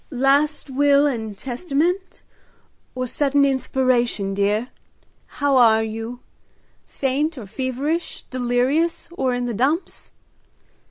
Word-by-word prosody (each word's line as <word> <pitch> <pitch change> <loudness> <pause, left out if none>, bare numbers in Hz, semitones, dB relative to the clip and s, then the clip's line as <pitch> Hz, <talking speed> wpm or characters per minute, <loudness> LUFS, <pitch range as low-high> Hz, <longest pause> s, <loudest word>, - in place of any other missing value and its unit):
"Last 280 +2 +1
will 285 +1 +4
and 220 -7 -2
testament, 340 - -2 0.7
or 255 0 -2
sudden 280 +2 +2
inspiration, 255 -6 +1
dear? 205 +5 0 0.7
How 285 -2 +2
are 220 -3 +5
you? 225 +3 -5 0.7
faint 285 +4 -1
or 235 - -7
feverish, 265 - -3
delirious 255 +6 0
or 265 -7 -1
in 245 0 -2
the 240 - -2
dumps! 275 - -1
260 Hz, 105 wpm, -22 LUFS, 240-285 Hz, 0.7 s, are